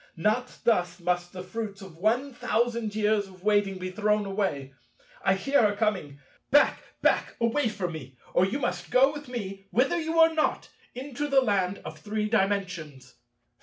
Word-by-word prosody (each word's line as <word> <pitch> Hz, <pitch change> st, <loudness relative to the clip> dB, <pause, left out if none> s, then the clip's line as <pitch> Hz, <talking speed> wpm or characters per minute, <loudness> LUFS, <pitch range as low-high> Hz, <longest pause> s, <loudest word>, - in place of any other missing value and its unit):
Not 215 Hz, +8 st, 0 dB
thus 180 Hz, -6 st, +1 dB
must 175 Hz, 0 st, -1 dB
the 180 Hz, -1 st, -7 dB
fruits 200 Hz, +1 st, -5 dB
of 190 Hz, -4 st, -11 dB
one 245 Hz, +8 st, +1 dB
thousand 235 Hz, -2 st, -1 dB
years 210 Hz, -1 st, +2 dB
of 185 Hz, -1 st, -16 dB
waiting 205 Hz, -2 st, +2 dB
be 185 Hz, 0 st, -5 dB
thrown 210 Hz, +1 st, +1 dB
away. 190 Hz, -9 st, -2 dB, 0.5 s
I 190 Hz, -, +4 dB
hear 275 Hz, +9 st, +2 dB
her 205 Hz, -2 st, +3 dB
coming. 190 Hz, -10 st, -1 dB, 0.3 s
Back! 290 Hz, +2 st, +4 dB, 0.2 s
back! -, -, +2 dB
Away 230 Hz, +2 st, +1 dB
from 190 Hz, -5 st, -3 dB
me, 135 Hz, -5 st, -9 dB, 0.2 s
or -, -, +4 dB
you 195 Hz, +8 st, 0 dB
must 180 Hz, -, -3 dB
go 270 Hz, -, +5 dB
with 295 Hz, -2 st, -8 dB
me—wither 235 Hz, -, -1 dB
you 320 Hz, +1 st, -2 dB
know 325 Hz, 0 st, +6 dB
not—into 290 Hz, -2 st, -3 dB
the 275 Hz, -2 st, +4 dB
Land 200 Hz, -5 st, 0 dB
of -, -, -8 dB
Three 215 Hz, 0 st, -2 dB
Dimensions!" 185 Hz, -, -1 dB
205 Hz, 165 wpm, -27 LUFS, 185-240 Hz, 0.5 s, know